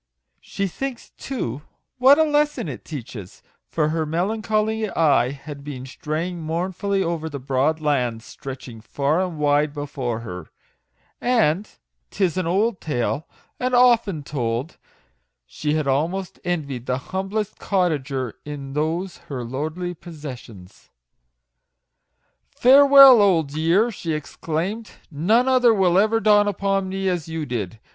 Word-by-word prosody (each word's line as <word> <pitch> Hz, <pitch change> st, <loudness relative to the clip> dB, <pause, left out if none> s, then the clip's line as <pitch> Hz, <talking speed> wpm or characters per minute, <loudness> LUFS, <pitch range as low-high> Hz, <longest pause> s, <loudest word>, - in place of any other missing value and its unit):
She 195 Hz, -, -4 dB
thinks, 250 Hz, +6 st, -5 dB
too, 145 Hz, -, -5 dB, 0.4 s
what 265 Hz, +3 st, +7 dB
a 315 Hz, -, +5 dB
lesson 295 Hz, -, +1 dB
it 135 Hz, -5 st, -7 dB
teaches; 120 Hz, -, -9 dB, 0.3 s
for 155 Hz, -2 st, 0 dB
her 160 Hz, 0 st, 0 dB
melancholy 215 Hz, +6 st, -1 dB
eye 145 Hz, -9 st, +3 dB
had 140 Hz, +1 st, -9 dB
been 135 Hz, -3 st, -7 dB
straying 160 Hz, +6 st, -4 dB
mournfully 185 Hz, +4 st, -1 dB
over 165 Hz, -2 st, -3 dB
the 145 Hz, -, -5 dB
broad 140 Hz, +4 st, 0 dB
lands 125 Hz, -7 st, -1 dB
stretching 130 Hz, -5 st, -9 dB
far 140 Hz, +8 st, 0 dB
and 180 Hz, -4 st, -5 dB
wide 145 Hz, 0 st, +2 dB
before 135 Hz, -5 st, -4 dB
her, 90 Hz, -7 st, -8 dB, 0.7 s
and 215 Hz, -6 st, +2 dB, 0.2 s
" -, -, -52 dB
'tis 185 Hz, -4 st, 0 dB
an 185 Hz, -2 st, -1 dB
old 200 Hz, +4 st, +1 dB
tale, 145 Hz, +1 st, -2 dB, 0.3 s
and 255 Hz, 0 st, 0 dB
often 230 Hz, -10 st, +4 dB
told," 125 Hz, 0 st, -3 dB, 0.7 s
she 150 Hz, -, -2 dB
had 155 Hz, -2 st, 0 dB
almost 165 Hz, +8 st, -1 dB
envied 140 Hz, -8 st, -3 dB
the 125 Hz, -, 0 dB, 0.2 s
humblest 195 Hz, +2 st, -3 dB
cottager 140 Hz, -, -1 dB
in 140 Hz, -2 st, -7 dB
those 165 Hz, +5 st, -2 dB
her 130 Hz, -4 st, -4 dB
lordly 155 Hz, +9 st, -4 dB
possessions. 130 Hz, -, -11 dB, 1.6 s
"Farewell, 275 Hz, -1 st, +8 dB
old 165 Hz, -8 st, +2 dB
year!" 170 Hz, +9 st, +2 dB
she 170 Hz, -6 st, -4 dB
exclaimed; 165 Hz, +8 st, -4 dB
" -, -, -34 dB
none 215 Hz, -, +2 dB
other 250 Hz, -3 st, +4 dB
will 185 Hz, -2 st, +3 dB
ever 220 Hz, +2 st, +3 dB
dawn 210 Hz, -2 st, +4 dB
upon 195 Hz, -1 st, 0 dB
me 195 Hz, 0 st, -2 dB
as 175 Hz, -4 st, -1 dB
you 160 Hz, -1 st, -4 dB
did. 115 Hz, -5 st, -4 dB
160 Hz, 135 wpm, -22 LUFS, 140-200 Hz, 1.6 s, Farewell